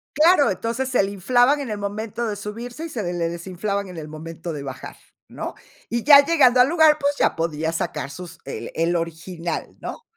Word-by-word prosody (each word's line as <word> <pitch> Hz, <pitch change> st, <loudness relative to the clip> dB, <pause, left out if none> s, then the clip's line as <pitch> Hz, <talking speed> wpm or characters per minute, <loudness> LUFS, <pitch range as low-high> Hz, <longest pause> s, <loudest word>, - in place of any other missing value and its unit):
Claro, 305 Hz, -, +5 dB
entonces 235 Hz, +7 st, -2 dB
se 250 Hz, -, +3 dB
le 195 Hz, -, -1 dB
inflaban 245 Hz, +8 st, +3 dB
en 265 Hz, -6 st, -4 dB
el 210 Hz, -, -3 dB
momento 215 Hz, +3 st, -3 dB
de 210 Hz, -, -2 dB
subirse 235 Hz, +8 st, -6 dB
y 330 Hz, -, -6 dB
se 235 Hz, -7 st, -4 dB
le 175 Hz, -2 st, -3 dB, 0.2 s
desinflaban 190 Hz, +4 st, -3 dB
en 180 Hz, -, -10 dB
el 155 Hz, -1 st, -6 dB
momento 165 Hz, +2 st, -7 dB
de 145 Hz, -, -5 dB
bajar, 130 Hz, -2 st, -7 dB, 0.3 s
¿no? -, -, -6 dB, 0.3 s
Y 235 Hz, -1 st, -1 dB
ya 285 Hz, -1 st, +9 dB
llegando 275 Hz, -6 st, +4 dB
al 255 Hz, -, +4 dB
lugar, 315 Hz, -2 st, +5 dB
pues 285 Hz, 0 st, +1 dB
ya -, -, +2 dB
podía 160 Hz, -1 st, -1 dB
sacar 150 Hz, -3 st, -3 dB
sus 175 Hz, +3 st, -9 dB
eh, -, -, -6 dB
el 170 Hz, +2 st, +1 dB
original, 170 Hz, +1 st, -4 dB
¿no? 475 Hz, -, -7 dB
205 Hz, 200 wpm, -23 LUFS, 170-255 Hz, 0.3 s, ya